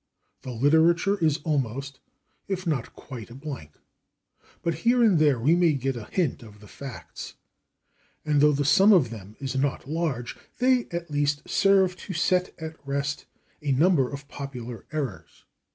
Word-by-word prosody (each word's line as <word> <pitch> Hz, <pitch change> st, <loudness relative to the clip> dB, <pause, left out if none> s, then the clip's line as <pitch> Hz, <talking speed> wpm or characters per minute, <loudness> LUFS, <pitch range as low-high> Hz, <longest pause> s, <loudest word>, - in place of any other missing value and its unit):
The 130 Hz, -, -8 dB
literature 160 Hz, -, +3 dB
is 155 Hz, -3 st, +2 dB
almost, 135 Hz, -2 st, -2 dB, 0.5 s
if 190 Hz, -1 st, -3 dB
not 145 Hz, -8 st, -2 dB
quite 120 Hz, -5 st, -9 dB
a 120 Hz, -, -11 dB
blank. 135 Hz, -, -7 dB, 0.9 s
But 165 Hz, -2 st, -1 dB
here 240 Hz, +1 st, +4 dB
and 200 Hz, -8 st, +5 dB
there 145 Hz, -5 st, +4 dB
we 145 Hz, +9 st, +4 dB
may 175 Hz, -3 st, +4 dB
get 135 Hz, -1 st, -1 dB
a 115 Hz, -3 st, -6 dB
hint 165 Hz, -, -1 dB
of 105 Hz, -3 st, -13 dB
the 105 Hz, -, -14 dB
facts, 135 Hz, +2 st, -9 dB, 0.9 s
and 150 Hz, -2 st, +2 dB
though 150 Hz, 0 st, +6 dB
the 145 Hz, 0 st, 0 dB
sum 195 Hz, +9 st, +6 dB
of 140 Hz, -, +4 dB
them 105 Hz, -2 st, -10 dB
is 135 Hz, -1 st, -4 dB
not 135 Hz, 0 st, -1 dB
large, 150 Hz, -6 st, -2 dB, 0.2 s
they 250 Hz, -1 st, +3 dB
at 170 Hz, -2 st, -5 dB
least 145 Hz, 0 st, 0 dB
serve 190 Hz, -2 st, +3 dB
to 190 Hz, -, -7 dB
set 180 Hz, +2 st, +1 dB
at 160 Hz, 0 st, -7 dB
rest 140 Hz, +1 st, -3 dB, 0.3 s
a 145 Hz, -2 st, 0 dB
number 145 Hz, -2 st, +3 dB
of 140 Hz, 0 st, -7 dB
popular 125 Hz, -6 st, -7 dB
errors. 140 Hz, -10 st, -5 dB
145 Hz, 165 wpm, -26 LUFS, 130-170 Hz, 0.9 s, though